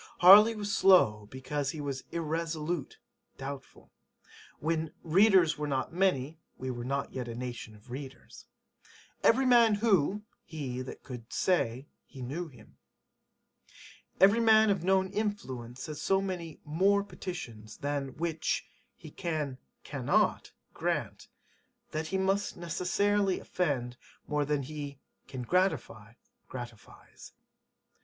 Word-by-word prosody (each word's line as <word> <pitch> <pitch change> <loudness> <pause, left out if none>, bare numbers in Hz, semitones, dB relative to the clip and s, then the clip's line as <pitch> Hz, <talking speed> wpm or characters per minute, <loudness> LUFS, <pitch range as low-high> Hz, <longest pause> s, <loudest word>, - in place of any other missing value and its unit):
Harley 210 +5 +9
was 205 -1 -2
slow 105 - +5
because 135 +2 -3
he 155 - -5
was 140 -2 -4
[irresolute] 165 -1 -3 0.4
doubtful. 135 0 -8 0.7
When 160 0 -2
[readers 180 -2 +4
were 150 - -2
not 135 +2 -2
many] 165 -5 +1 0.2
we 130 0 -4
were 120 -1 -5
not 140 +2 -2
yet 125 -2 -4
a 115 - -5
nation 120 -3 -6
of 105 +4 -17
readers. 135 +1 -9 0.7
[Every 260 +3 +4
man 235 -4 +6
who] 205 -2 +2 0.2
he 135 -6 -5
that 130 - -8
could 120 -3 -9
say 135 -8 0 0.2
he 130 -3 -9
knew 160 +8 -4
him. 125 -8 -18 1.4
Every 200 +4 +6
man 220 -2 +6
of 195 -4 -1
known 190 0 +2
influence 130 - -4
has 150 -1 -6
so 195 0 +2
many 180 -5 -5
[more] 195 +7 +3
petitions 115 - -8
[than] 140 -2 -3
which 165 -1 -1 0.3
he - - -12
[can] 150 -6 -3 0.2
cannot - - 0 0.2
grant, - - -2 0.6
that 155 +1 -3
he 190 - -1
must 195 +2 0
necessarily 190 +3 +1
offend 130 -9 -2 0.3
more 150 -1 0
than 145 -1 0
he 145 0 -6 0.3
[can 130 -2 -6
gratify] 120 - 0 0.3
gratifies. 120 -3 -11
155 Hz, 125 wpm, -30 LUFS, 130-190 Hz, 1.4 s, Harley